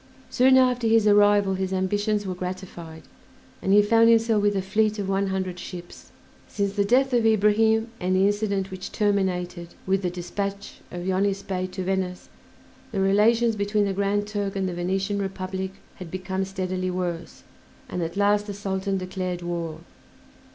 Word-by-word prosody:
Soon 260 +1 +5
after 250 -2 +3
his 225 -1 +4
arrival 205 -1 +5
his 190 0 -2
ambitions 205 +2 0
were 185 - -2
gratified, 180 -3 -7 0.6
and 190 - 0
he 205 +1 +7
found 230 +2 +5
himself 225 -2 +4
with 205 0 +2
a 195 - +1
fleet 215 +2 +1
of 200 -2 -3
one 195 0 0
hundred 185 -2 -3
ships. 175 -1 -10 0.4
Since 200 -1 -2
the 200 0 +1
death 255 +5 +2
of 240 -2 +3
Ibrahim, 220 +1 +3
and 185 +1 0
the 190 +1 +4
incident 200 -2 0
which 185 0 -7
terminated 180 -4 -1
with 195 +1 +1
the 180 - -1
dispatch 195 +3 -5
of 175 0 -6
Yonis 195 +1 0
Bey 185 -1 -2
to 185 0 -5
Venice, 185 -1 -2 0.6
the 200 - -2
relations 220 +4 +3
between 205 0 +1
the 195 - -1
Grand 200 +1 0
Turk 205 -2 -3
and 190 -1 -1
the 180 - -3
Venetian 195 +3 -1
Republic 190 0 -4 0.2
had 180 -3 -8
become 190 +1 -3
steadily 185 -1 -3
worse, 175 -2 -4 0.4
and 180 - -4
at 170 +3 -4
last 205 +1 +2
the 205 - -5
Sultan 195 -1 -2
declared 185 -1 -4
war. 170 -2 -4
195 Hz, 170 wpm, -25 LUFS, 185-205 Hz, 0.6 s, he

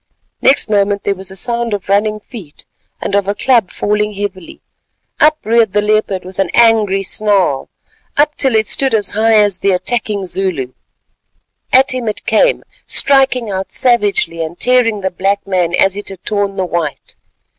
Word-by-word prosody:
Next 275 - +3
moment 205 -1 0
there 200 - 0
was 190 0 -8
a 190 - -10
sound 235 +2 0
of 200 - -8
running 210 +2 +1
feet 205 - -12 0.3
and - - -4
of 200 -1 +1
a 200 - -1
club 235 -7 +2
falling 210 0 -1
heavily. 195 -3 -6 0.6
Up 305 0 +4
reared 225 -2 +2
the 205 - +2
leopard 210 -3 0
with 185 +1 -10
an 195 - +1
angry 215 -4 +3
snarl, 195 -9 0 0.5
up 295 +1 +3
till 265 -4 +1
it 220 0 +2
stood 265 +2 +1
as 210 -2 0
high 220 +2 +2
as 205 -3 +3
the 200 - 0
attacking 205 +1 -1
Zulu. 175 -8 -2 1.0
At 265 +1 +4
him 250 -3 -4
it 210 - -4
came, - - +2 0.2
striking 265 -5 +2
out 190 0 -4
savagely 205 -9 +1
and 160 +2 -8
tearing 245 -4 +2
the 190 0 -2
black 195 +2 -1
man 180 -3 0
as 195 +1 +2
it 205 - -5
had 190 -2 -10
torn 205 -1 -2
the 190 -1 -1
white. 170 -5 -4
205 Hz, 175 wpm, -14 LUFS, 190-225 Hz, 1.0 s, Up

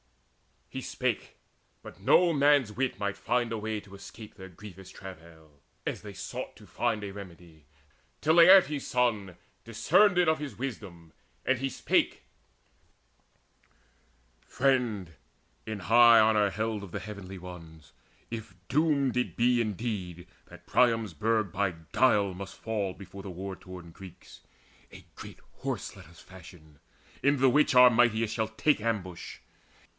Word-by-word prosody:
He - - -7
spake; - - -3 0.5
but - - -12
no 175 -1 +4
man's 145 -5 +3
wit 125 +2 -2
might 100 0 -3
find 120 +3 -1
a 115 - -2
way 110 0 -3
To 100 -1 -17
escape 105 +2 -11
their 95 - -11
grievous 95 0 -12
travail, 80 -5 -13 0.3
as - - -3
they - - -9
sought - - -7
To - - -16
find 115 -3 -2
a 100 - -5
remedy, 85 -5 -12 0.5
till 160 +1 +2
Laertes' 170 -5 +6
son 110 -7 0 0.3
Discerned 180 - +3
it 180 -1 +4
of 160 - +1
his 150 -2 -7
wisdom, 100 -10 -7 0.3
and 130 -1 +1
he 135 +1 -1
spake: - - 0 2.2
"Friend, 125 -9 0 0.6
in 110 -2 -4
high 115 +3 +7
honour 110 -2 +4
held 110 0 -3
of 95 - -10
the 100 - -4
Heavenly 100 -2 -8
Ones, 80 -5 -12 0.4
If 110 -5 -7
doomed 140 -2 +1
it 125 - -1
be 120 +1 +3
indeed 100 -5 -4 0.2
that - - -15
Priam's 115 -6 +2
burg 110 +3 0
By 95 -1 -1 0.2
guile 100 -7 +3
must 95 +2 -8
fall 105 -4 -3
before 95 +1 -11
the 95 - -8
war 95 +1 -6
worn 90 -2 -10
Greeks, 95 +1 -14 0.5
A - - -12
great - - -11 0.2
Horse - - -4
let - - -13
us 85 +1 -17
fashion, 85 -5 -15 0.4
in 140 +1 +3
the 135 0 +5
which 145 0 +3
Our 125 0 +8
mightiest 115 -2 +2
shall 110 -1 -1
take 110 +7 +1
ambush. 100 -6 -4
105 Hz, 145 wpm, -28 LUFS, 95-125 Hz, 2.2 s, Our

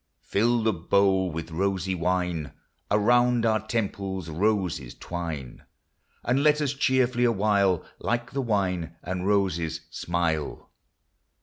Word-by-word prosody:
Fill 115 +3 +2
the 110 -1 +2
bowl 95 +2 +2
with 80 0 -6
rosy 95 +2 0
wine! 90 -4 -1 0.4
Around 120 +3 +3
our 110 -1 +3
temples 100 -5 -2
roses 90 - 0
twine! 80 -7 -6 0.6
And 125 +3 +2
let 150 0 +4
us 145 -2 0
cheerfully 130 -3 +2
awhile, 100 -5 +2
Like 120 0 -2
the 140 - -1
wine 90 - -1
and 90 +2 -3
roses, 85 -5 +1
smile. 85 -3 -2
95 Hz, 115 wpm, -26 LUFS, 85-115 Hz, 0.6 s, let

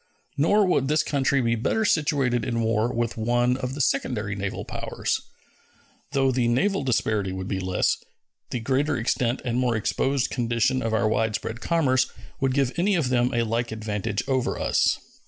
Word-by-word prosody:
Nor 200 +8 +3
would 160 -7 +2
this 150 +2 +2
country 140 -1 +1
be 115 -1 +1
better 135 - 0
situated 140 - +1
in 115 -1 -1
war 115 +1 +1
with 120 -2 -2
one 120 +2 +2
of 130 0 -4
the 150 - -2
secondary 110 -6 0
naval 100 0 -4
powers. - - -3 0.9
Though 135 -2 +3
the 125 -2 +1
naval 140 +11 +1
disparity 110 -6 0
would 95 0 -5
be 95 - -2
less, 95 -1 +1 0.5
the 120 - -3
greater 135 +5 +1
extent 120 +2 0
and 120 0 0
more 125 -2 +1
exposed 135 +5 0
condition 120 +1 +1
of 115 -2 0
our 110 0 +2
widespread 110 +1 -1
commerce 130 -6 +2 0.3
would 135 -1 +1
give 135 -3 +2
any 195 +4 +2
of 155 -7 0
them 125 -1 +2
a 120 -1 +1
like 115 +1 -1
advantage 105 -2 -3
over 130 -2 0
us. - - +2
120 Hz, 175 wpm, -25 LUFS, 110-135 Hz, 0.9 s, Nor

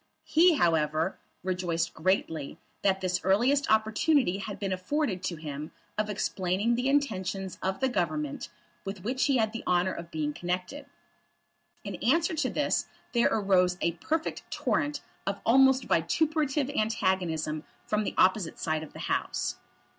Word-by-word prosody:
He, 335 +2 +5
however, 160 - +1 0.2
rejoiced 180 -3 -1
greatly 160 -4 -1 0.2
that 195 -1 +2
this 185 -1 0
earliest 245 +10 +3
opportunity 220 - +3
had 200 +1 -5
been 195 -2 -2
afforded 190 +1 -1
to 175 - -2
him 150 -1 -6 0.2
of 215 0 -1
explaining 195 +2 0
the 250 +3 +1
intentions 195 -9 -1
of 190 +6 -2
the 265 - +3
Government 155 - -2 0.3
with 195 -1 -6
which 255 +5 0
he 275 -3 +3
had 220 -1 +1
the 230 - -5
honour 180 +1 +2
of 170 0 -7
being 150 -2 -2
connected. 180 - -4 1.0
In - - -5
answer 330 0 +2
to 320 - 0
this - - 0 0.3
there 235 -1 +4
arose 185 -4 +3
a 170 - +1
perfect 310 - -2
torrent 295 0 -1 0.3
of 200 0 -1
almost 265 +2 +5
vituperative 290 - +1
antagonism 185 - 0 0.2
from 210 0 0
the - - -3
opposite 185 -2 +3
side 155 -1 -1
of 155 - -10
the - - -10
House. - - -1
195 Hz, 145 wpm, -29 LUFS, 175-255 Hz, 1.0 s, He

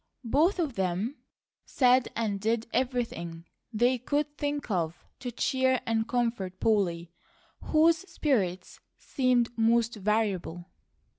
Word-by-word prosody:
Both 310 - +3
of 315 -7 -1
them 190 - -2 0.5
said 255 -1 +3
and 205 -4 -1
did 225 +1 0
everything 230 -10 -2 0.3
they 245 +3 +2
could 290 +4 -1
think 290 -4 -3
of 170 -3 -2
to 245 -1 -5
cheer 260 +1 +1
and 225 0 0
comfort 230 -7 -2
Polly, 175 -6 +1 0.5
whose 325 +1 +4
spirits 190 - -1 0.2
seemed 245 -3 +1
most 230 0 +2
variable. 195 -5 -1
230 Hz, 115 wpm, -28 LUFS, 195-260 Hz, 0.5 s, whose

